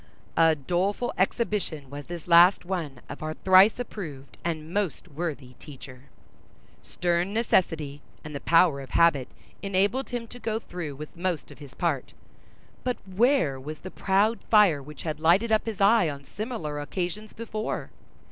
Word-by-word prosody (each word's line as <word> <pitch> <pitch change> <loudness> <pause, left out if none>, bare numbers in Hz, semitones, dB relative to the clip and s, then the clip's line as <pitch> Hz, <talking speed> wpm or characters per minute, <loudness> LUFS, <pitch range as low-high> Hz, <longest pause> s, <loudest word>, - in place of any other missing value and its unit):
A 165 -1 +5
doleful 180 - -1
exhibition 190 - -1
was 145 0 -8
this 175 -1 -7
last 175 +2 +6
one 165 -8 -4
of 145 - -8
our 155 0 -4
thrice 190 +3 +6
approved 160 - -7
and 160 -1 -4
most 200 -5 -2
worthy 145 -5 -5
teacher! 130 -3 -12 0.8
Stern 175 +3 -1
necessity 160 -10 +1 0.2
and 150 - -8
the 140 - -4
power 165 -3 +4
of 135 - -10
habit 150 -7 +4 0.3
enabled 200 +6 0
him 240 -1 -3
to 245 - -11
go 220 -2 -2
through 175 -9 -6
with 150 +2 -9
most 175 -2 -3
of - - -14
his 140 -3 -12
part, 160 -7 -1 0.7
but 250 -1 -1
where 195 - +2
was 150 +4 -7
the 185 - -8
proud 205 +4 +2
fire 205 -10 +5
which 150 +2 -10
had 155 -2 -3
lighted 180 +8 +3
up 220 +1 +2
his 220 -3 -4
eye 200 -3 +5
on 140 -1 -7
similar 170 - -5
occasions 180 +7 -4
before? 215 -1 -4
175 Hz, 155 wpm, -26 LUFS, 150-205 Hz, 0.8 s, last